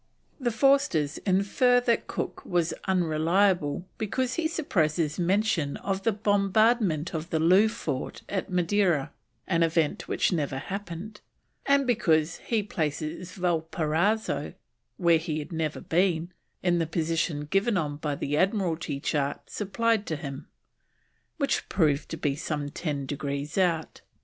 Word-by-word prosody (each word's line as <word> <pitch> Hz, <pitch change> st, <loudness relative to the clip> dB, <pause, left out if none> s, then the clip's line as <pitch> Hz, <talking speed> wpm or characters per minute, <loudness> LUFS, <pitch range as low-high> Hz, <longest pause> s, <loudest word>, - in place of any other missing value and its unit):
The 250 Hz, -3 st, 0 dB
Forsters 230 Hz, -, +2 dB
infer 200 Hz, +7 st, +3 dB
that 235 Hz, -2 st, +1 dB
Cook -, -, -4 dB
was 175 Hz, -2 st, 0 dB
unreliable 175 Hz, -1 st, +2 dB
because 255 Hz, +4 st, -1 dB
he 325 Hz, +2 st, 0 dB
suppresses 165 Hz, -, 0 dB
mention 180 Hz, -5 st, +1 dB
of 195 Hz, -1 st, -2 dB
the 225 Hz, -, +2 dB
bombardment 205 Hz, -4 st, +2 dB
of 160 Hz, +1 st, -4 dB
the 165 Hz, -, 0 dB
Loo 185 Hz, +7 st, +5 dB
fort 215 Hz, -, -4 dB
at 200 Hz, +1 st, -3 dB
Madeira, 180 Hz, -4 st, +1 dB, 0.3 s
an 170 Hz, -2 st, +1 dB
event 165 Hz, -2 st, +1 dB
which -, -, +1 dB
never 145 Hz, -5 st, -1 dB
happened; 195 Hz, +5 st, -6 dB, 0.5 s
and 280 Hz, 0 st, +4 dB
because 165 Hz, -9 st, +2 dB
he 225 Hz, -3 st, -1 dB
places 165 Hz, 0 st, -3 dB
Valparaiso 165 Hz, 0 st, 0 dB, 0.4 s
(where 170 Hz, -2 st, +4 dB
he 160 Hz, -2 st, -3 dB
had 150 Hz, +2 st, -6 dB
never 160 Hz, -2 st, -2 dB
been) 175 Hz, -1 st, +1 dB, 0.3 s
in 175 Hz, -1 st, +2 dB
the 165 Hz, -, 0 dB
position 165 Hz, -2 st, -1 dB
given 195 Hz, +7 st, +1 dB
on 145 Hz, -4 st, -2 dB, 0.2 s
the 145 Hz, +1 st, -1 dB
Admiralty 170 Hz, -6 st, 0 dB
chart 140 Hz, -1 st, -2 dB
supplied 220 Hz, +1 st, 0 dB
to 160 Hz, -, -1 dB
him, 140 Hz, -1 st, -7 dB, 0.9 s
which 280 Hz, -3 st, 0 dB
proved 150 Hz, -5 st, +1 dB
to 165 Hz, -, -4 dB
be 145 Hz, -3 st, 0 dB
some 145 Hz, -1 st, -3 dB
10 145 Hz, -3 st, -3 dB
degrees 140 Hz, +1 st, -4 dB
out. 170 Hz, -4 st, 0 dB
170 Hz, 135 wpm, -27 LUFS, 155-205 Hz, 0.9 s, Loo